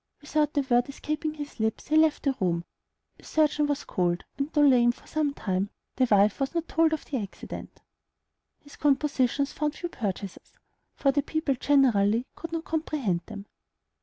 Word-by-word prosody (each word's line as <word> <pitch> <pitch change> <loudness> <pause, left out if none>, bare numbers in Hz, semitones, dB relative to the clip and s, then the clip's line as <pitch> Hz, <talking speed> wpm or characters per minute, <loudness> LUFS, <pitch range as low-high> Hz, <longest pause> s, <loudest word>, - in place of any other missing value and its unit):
Without 300 0 0
a - - +5
word 245 -1 +2
escaping 305 +2 -3
his 290 -4 -8
lips, 220 +4 -2
he 310 - +2
left 315 -1 +4
the 275 -2 +1
room, 170 -2 0 0.5
a - - -18
surgeon 300 -1 +2
was 290 0 -1
called, 175 -1 -1 0.2
and, 280 +2 -1
though 295 - +2
lame 245 -3 +5
for - - -18
some 305 -2 0
time, 195 -6 -2 0.3
the 255 -1 +3
wife 205 0 +4
was 275 +4 -2
not 335 0 -1
told 325 0 +3
of 315 - -2
the 275 - -3
accident. 200 -1 -9 0.8
His 285 - -15
compositions 280 -1 +1
found 300 0 -1
few 345 - -5
purchasers, 200 - -5 0.4
for 275 - +2
the 285 - +1
people 315 0 -1
generally 245 -5 +3
could 330 - -7
not 330 -1 -3
comprehend 295 - -1
them. 205 -3 -8
280 Hz, 175 wpm, -27 LUFS, 220-300 Hz, 0.8 s, a